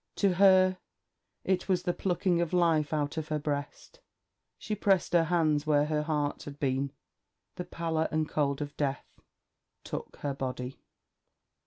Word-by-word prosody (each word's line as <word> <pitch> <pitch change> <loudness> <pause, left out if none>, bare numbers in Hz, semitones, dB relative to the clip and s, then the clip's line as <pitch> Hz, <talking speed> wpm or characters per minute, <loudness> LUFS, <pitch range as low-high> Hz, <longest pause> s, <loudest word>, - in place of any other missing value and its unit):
To 200 -3 +2
her 185 0 +5 0.6
it 190 0 0
was 180 -1 +2
the 175 -1 0
plucking 180 -1 0
of 170 0 -2
life 165 -4 +3
out 150 0 -1
of 160 -1 -3
her 155 - -1
breast. 145 -1 -5 0.6
She 215 - -4
pressed 195 -4 +1
her 170 -1 +5
hands 155 -3 +1
where 145 -1 +4 0.2
heart 150 -2 -1
had 145 0 -9
been. 135 0 0 0.7
The 180 - -4
pallor 160 -1 -1
and 155 0 0
cold 145 -1 0
of 145 - -9
death 140 -1 -1 0.8
took - - -6
her 145 -1 -1
body. 130 -1 -5
155 Hz, 150 wpm, -29 LUFS, 145-180 Hz, 0.8 s, her